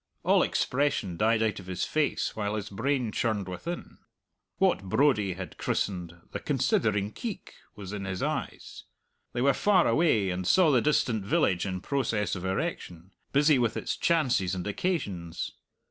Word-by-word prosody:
All - - +4
expression 125 -9 0
died 110 +4 +2
out 110 -2 0
of 95 - -12
his 90 -1 -2
face 155 -2 0
while 105 -1 -2
his 105 -1 -5
brain 125 +2 0
churned 105 -4 -1
within. 170 - -6 0.6
What 190 - +3
Brodie 105 -3 +2
had 95 0 -8
christened 90 -3 -2
"the - - -4
considering 110 -7 +1
keek" 225 - -6 0.2
was 100 -1 -8
in 100 -2 -4
his 95 -1 -3
eyes; - - -4 0.5
they 120 - 0
were 140 0 +5
far 195 -4 +3
away, 115 - +3
and 90 0 -3
saw 180 - +5
the 125 -4 +4
distant 120 -7 +1
village 95 -1 +1
in 95 -1 -3
process 115 -7 -1
of 90 - -6
erection; 95 -1 -3 0.2
busy 145 0 +4
with 120 -3 +1
its - - -2
chances 130 - +1
and 90 - -4
occasions. 100 - -2
105 Hz, 160 wpm, -28 LUFS, 95-140 Hz, 0.6 s, were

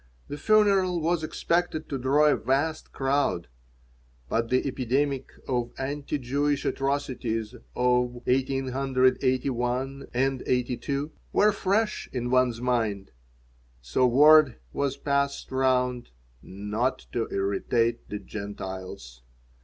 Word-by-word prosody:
The 145 - -5
funeral 195 -3 +3
was 165 +1 0
expected 165 0 -1
to 135 - -3
draw 140 +4 +3
a 150 - +5
vast 145 +4 -1
crowd. 135 -10 0 0.8
But 115 0 0
the 130 0 +2
epidemic 135 +1 -1 0.2
of 120 -2 -1
anti 145 +2 -3
Jewish 140 +2 -1
atrocities 125 -5 -2 0.2
of 125 0 +2
1881 130 -1 +1 0.2
and 135 +1 0
1882 130 +4 -2 0.2
were 210 +1 +4
fresh 205 +2 0
in 125 -1 -3
one's 130 -2 +2
mind, 115 -6 -1 0.7
so 60 - +1
word 150 +1 +6 0.2
was 140 -1 -1
passed 140 0 -1
round 125 -2 +1 0.3
"not 105 +7 -3
to 115 -1 -1
irritate 115 +4 0
the 105 - -3
Gentiles." 95 - -7
130 Hz, 105 wpm, -26 LUFS, 120-140 Hz, 0.8 s, word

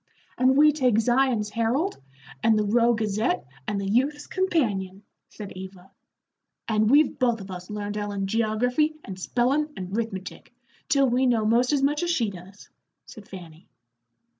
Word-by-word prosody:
"And 260 +1 +3
we 300 +1 +7
take 255 -7 +1
Zion's 240 -2 +1
Herald, 235 - -1 0.4
and 220 -1 +3
The 215 - +2
Rowe 235 +3 +3
Gazette, 215 - -1 0.2
and 205 -1 -1
The 195 - -3
Youth's 265 +9 0
Companion," 210 - -1 0.3
said 205 -2 -9
Eva. 185 0 -11 0.8
"And 215 -1 +2
we've 285 +1 +4
both 240 -3 +1
of 195 -1 -9
us 180 0 -8
learned 210 0 -4
Ellen 205 -1 -3
geography 230 +8 0
and 190 -1 -8
spellin' 265 +9 0
and 185 +1 -5
'rithmetic, 205 -4 -5 0.4
till 275 -2 +4
we 255 +2 +2
know 230 -3 +2
most 240 +4 +3
as 285 -2 +1
much 295 +3 +1
as 345 - -1
she 235 -11 0
does," 190 +2 -13 0.4
said 215 -4 -13
Fanny. 175 -2 -12
225 Hz, 160 wpm, -25 LUFS, 200-260 Hz, 0.8 s, we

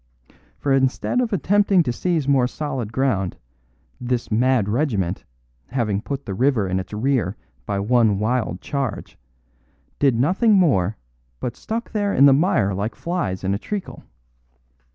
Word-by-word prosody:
For 140 - 0
instead 135 - +1
of 240 -2 -1
attempting 200 0 +3
to 120 - -2
seize 165 -1 -1
more 135 -3 +3
solid 135 -6 -4
ground, 115 -9 0 0.6
this 125 -1 -2
mad 120 -1 +2
regiment, 105 - -1 0.4
having 110 -6 -1
put 140 +3 -5
the 100 - -4
river 120 -1 +1
in 95 0 0
its 95 - -7
rear 110 -3 0 0.3
by 100 - -1
one 110 -1 +3
wild 110 -3 -1
charge, 140 -4 -4 0.8
did 135 -4 +3
nothing 185 - +3
more, 110 - +3 0.4
but 120 - -4
stuck 230 +2 -5
there 205 -2 0
in 135 - +6
the 140 - +7
mire 135 - +2
like 100 +4 -3
flies 135 - -3
in 95 +1 0
treacle. 205 - -6
125 Hz, 145 wpm, -22 LUFS, 105-145 Hz, 0.8 s, the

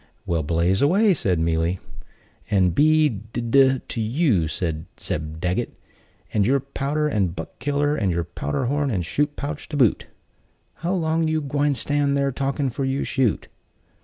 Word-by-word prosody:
"Well, 85 -2 0
blaze 85 +5 +1
away," 195 +8 +4
said 100 - +1
Mealy, 80 +2 0 0.7
"and 95 -5 +3
be 155 - +4
d 110 -1 -5
d 130 +2 +3
to 115 - -3
you, 110 - +1
and 80 -3 -2
Zeb 80 +1 -4
Daggett, 90 +2 -2 0.6
and 105 - +3
your 135 +7 +3
powder, 140 +3 -2
and 95 - 0
Buck - - -8
killer, 145 +3 0
and 100 -10 0
your 85 0 0
powder 75 - -3
horn 145 +2 0
and 95 -8 -1
shot 145 - -1
pouch 145 +1 -5
to 150 - -3
boot! 125 -7 +2 0.7
How 175 +3 -2
long 160 -2 +1
you 155 0 +1
gwine 145 0 0
stand 140 +2 +1
thar 140 0 +1
talking 135 +1 -1
'fore 135 - -3
you 135 +1 -1
shoot?" 130 -6 0
135 Hz, 165 wpm, -23 LUFS, 90-145 Hz, 0.7 s, away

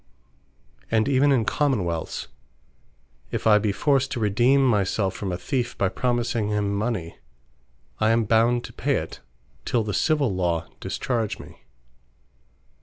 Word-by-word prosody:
And 110 -1 +2
even 140 +1 +3
in 120 -5 +2
Common 140 -6 +1
wealths, 85 -2 -3 1.0
if - - -4
I 105 -1 +6
be 105 -1 0
forced 135 +5 +1
to 125 - -3
redeem 120 +6 +3
my 105 -6 +3
selfe 95 0 -1
from 95 -2 -4
a 90 - -2
Theefe 120 +6 -2
by 95 - +1
promising 120 -2 -1
him 105 -1 0
mony, 100 -6 -3 0.8
I 110 - +3
am 115 0 +3
bound 115 +3 +2
to - - -9
pay - - 0
it, - - -4 0.4
till 115 - 0
the 105 -1 -3
Civill 145 -6 +1
Law 85 -3 0
discharge 115 -5 -2
me. - - -14
110 Hz, 150 wpm, -24 LUFS, 100-125 Hz, 1.0 s, I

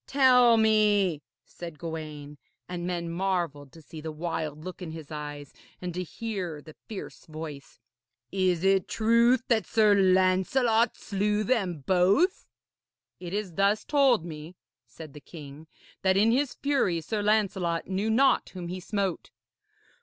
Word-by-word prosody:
'Tell 250 -4 +5
me,' 210 -7 +3 0.2
said 170 -3 -9
Gawaine, 150 -3 -7 0.3
and 175 -1 -5
men 175 -1 -3
marvelled 170 -6 -2
to 160 - -14
see 155 +1 -10
the 160 0 -5
wild 155 -1 -4
look 185 +1 -8
in 175 - -6
his 160 -1 -9
eyes 145 -2 -7 0.3
and 180 -1 -5
to 180 - -3
hear 180 -4 -5
the 155 +1 -13
fierce 210 -4 -9
voice, 155 -3 -9 0.5
'is 185 -3 +1
it 195 -1 +3
truth 235 +3 +3
that 225 -3 +1
Sir 215 -2 +4
Lancelot 195 +5 +3
slew 210 +1 -1
them 195 - -1
both?' 195 - +2 0.7
'It 175 -1 -7
is 200 -3 -3
thus 200 +4 +1
told 270 - +3
me,' 160 +1 -9 0.3
said 155 -4 -11
the 150 - -11
King, 150 0 -11 0.3
'that 190 0 +2
in 215 +3 +4
his 270 +2 0
fury 275 -12 0
Sir 205 +7 -3
Lancelot 195 -5 0
knew 195 +4 -2
not 265 +5 +3
whom 175 -2 -6
he 185 +1 -5
smote.' 195 -1 -3
185 Hz, 145 wpm, -27 LUFS, 160-215 Hz, 0.7 s, Tell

